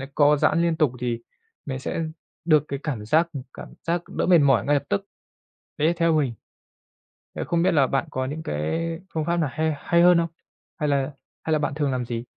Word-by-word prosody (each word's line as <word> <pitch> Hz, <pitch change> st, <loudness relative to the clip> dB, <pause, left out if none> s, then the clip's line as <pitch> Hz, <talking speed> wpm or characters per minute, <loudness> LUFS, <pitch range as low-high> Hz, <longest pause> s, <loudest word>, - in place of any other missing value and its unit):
co 150 Hz, 0 st, +5 dB
giãn 160 Hz, +3 st, +3 dB
liên 170 Hz, -1 st, +2 dB
tục 150 Hz, -6 st, +3 dB
thì 120 Hz, -2 st, -2 dB, 0.5 s
mình 130 Hz, -2 st, -4 dB
sẽ 135 Hz, -, -3 dB, 0.4 s
được 155 Hz, -3 st, +5 dB
cái 140 Hz, -, -4 dB
cảm 125 Hz, -9 st, -3 dB
giác 160 Hz, +9 st, +3 dB, 0.3 s
cảm -, -, -10 dB
giác 170 Hz, +1 st, +1 dB
đỡ -, -, -1 dB
mệt 180 Hz, -1 st, +6 dB
mỏi 135 Hz, -8 st, +4 dB
ngay 145 Hz, -, +3 dB
lập 140 Hz, -, 0 dB
tức. 200 Hz, -1 st, 0 dB, 0.7 s
Đấy 155 Hz, 0 st, +2 dB
là 170 Hz, -, +3 dB
theo 165 Hz, -1 st, +3 dB
mình, 145 Hz, -6 st, +1 dB, 1.0 s
thế -, -, -2 dB
không 170 Hz, -1 st, 0 dB
biết 185 Hz, -, +4 dB
là 140 Hz, -4 st, +4 dB
bạn 135 Hz, -, 0 dB
có 130 Hz, 0 st, -2 dB
những 150 Hz, +4 st, -5 dB
cái 165 Hz, -, -2 dB
phương 160 Hz, -1 st, -1 dB
pháp 170 Hz, +1 st, 0 dB
nào 160 Hz, -4 st, +1 dB
hay 160 Hz, +1 st, 0 dB
hay 170 Hz, +4 st, +2 dB
hơn 175 Hz, 0 st, +7 dB
không? 170 Hz, 0 st, +1 dB, 0.5 s
Hay 150 Hz, -4 st, 0 dB
là 140 Hz, +1 st, 0 dB, 0.3 s
hay 160 Hz, -, 0 dB
là 155 Hz, -, +2 dB
bạn 145 Hz, -, -1 dB
thường 145 Hz, -2 st, 0 dB
làm 125 Hz, -1 st, -2 dB
gì? 115 Hz, 0 st, -4 dB
150 Hz, 225 wpm, -24 LUFS, 135-165 Hz, 1.0 s, hơn